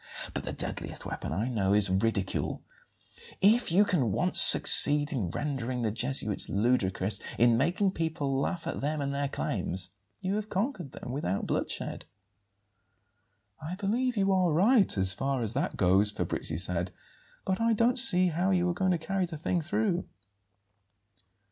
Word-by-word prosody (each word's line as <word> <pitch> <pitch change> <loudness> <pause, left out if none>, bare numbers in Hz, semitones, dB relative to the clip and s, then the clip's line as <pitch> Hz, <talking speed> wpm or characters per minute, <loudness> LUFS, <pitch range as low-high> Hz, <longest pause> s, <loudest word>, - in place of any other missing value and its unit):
But - - -5
the - - -4
deadliest - - -6
weapon - - -6
I 110 +5 -2
know 100 -6 -1
is 100 -2 +3
ridicule. 100 0 -2 0.8
If 215 +1 +3
you 200 +5 +4
can 150 - 0
once - - +4
succeed 145 +1 +8
in 105 -10 -2
rendering 130 - -4
the 110 - -1
Jesuits 120 -2 -2
ludicrous, 100 -2 -1 0.2
in 120 0 +4
making 175 - 0
people 160 -6 -3
laugh 165 +6 -3
at - - -5
them 150 +2 -2
and 140 -1 -3
their 140 0 -2
claims, 95 -8 -3 0.3
you 195 +1 -2
have 215 0 -5
conquered 195 - -4
them 125 - -8
without 100 -8 -3
bloodshed." - - -4 1.6
"I 160 +4 -6
believe 230 +5 -2
you 195 -1 +1
are 185 -3 +1
right, 200 - +3
as 95 0 +4
far 135 +3 -2
as 110 0 -1
that 140 - -3
goes," 95 +2 +2
Fabrizi 80 -5 -3
said; 90 -1 0 0.6
"but 190 +2 -2
I 230 0 +2
don't 235 +3 +1
see 185 -8 +4
how 175 +3 -1
you 180 -2 +1
are - - -1
going 185 +1 -1
to - - 0
carry 185 +3 -3
the 165 -2 -8
thing 170 +3 -2
through." 185 +1 -2
150 Hz, 160 wpm, -28 LUFS, 115-190 Hz, 1.6 s, succeed